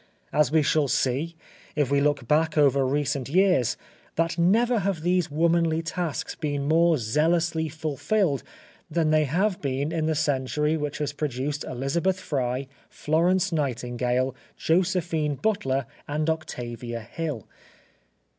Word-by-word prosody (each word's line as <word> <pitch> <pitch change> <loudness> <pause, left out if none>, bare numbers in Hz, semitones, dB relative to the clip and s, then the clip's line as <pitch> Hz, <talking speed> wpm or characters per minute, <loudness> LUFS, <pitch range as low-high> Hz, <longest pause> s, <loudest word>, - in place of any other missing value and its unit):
And 150 -4 +3
we 160 -1 +4
shall 150 0 +2
see, 135 +6 0 0.4
if 145 -3 +1
we 140 0 +3
look 145 -4 +1
back 155 +2 +2
over 140 -2 +4
recent 140 -1 -1
years, 180 - +3 0.4
that 165 0 +1
never 225 +8 +3
have 195 -4 -1
these 180 -1 +1
womanly 165 +1 +2
tasks 165 -2 -3
been 145 -3 -3
more 165 +1 +4
zealously 160 +7 +1
fulfilled 155 - 0 0.5
than 160 -1 +1
they 155 -1 +4
have 185 +7 0
been 140 +2 -1
in 160 -2 -1
the 160 - +1
century 150 +1 0
which 150 -2 -3
has 150 -1 -2
produced 145 0 -3
Elizabeth 165 +9 -1
Fry, 130 -6 -2 0.2
Florence 170 +4 +1
Nightingale, 125 -3 -1 0.2
Josephine 165 -3 +1
Butler, 135 - 0 0.2
and 150 +1 -1
Octavia 120 -6 -5
Hill. 135 - -5
150 Hz, 130 wpm, -26 LUFS, 135-165 Hz, 0.5 s, we